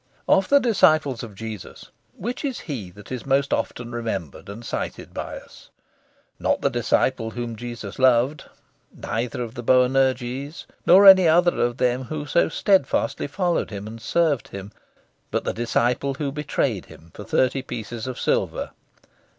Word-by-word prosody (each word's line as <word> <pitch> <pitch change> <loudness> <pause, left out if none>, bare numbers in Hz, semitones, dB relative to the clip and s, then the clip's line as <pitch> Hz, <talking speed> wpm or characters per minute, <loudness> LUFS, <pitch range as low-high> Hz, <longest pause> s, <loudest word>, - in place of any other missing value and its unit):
Of 190 - +3
the 280 - +7
disciples 155 - +3
of 110 -4 -9
Jesus, 110 -3 -8 0.3
which 240 - -4
is 270 -4 -3
he 120 - -6
that 100 +5 -14
is 125 -2 -4
most 140 0 +1
often 120 -1 -3
remembered 100 - -5
and 110 +4 -8
cited - - -5
by - - -5
us? - - -15 0.7
Not - - 0
the - - +1
disciple 110 - +1
whom 120 0 -5
Jesus 120 -2 -7
loved; 130 +3 +3 0.5
neither 120 +1 -3
of 115 -1 -7
the 120 - -6
Boanerges, 130 +3 +1 0.2
nor 190 +3 +8
any 190 -2 +9
other 175 +2 +4
of 120 0 0
them 125 +1 0
who 150 +3 -5
so 160 - +2
steadfastly 160 -7 +1
followed 175 +3 -1
Him 100 -1 -6
and 110 +1 -9
served 155 -4 +1
Him; 100 +1 -8 0.6
but - - -1
the - - -2
disciple 120 +3 0
who 140 0 -3
betrayed 150 +2 -1
Him 85 +1 -16
for - - -9
thirty 130 +1 +1
pieces 120 -2 -6
of 130 - -5
silver. - - -1
125 Hz, 160 wpm, -23 LUFS, 115-150 Hz, 0.7 s, any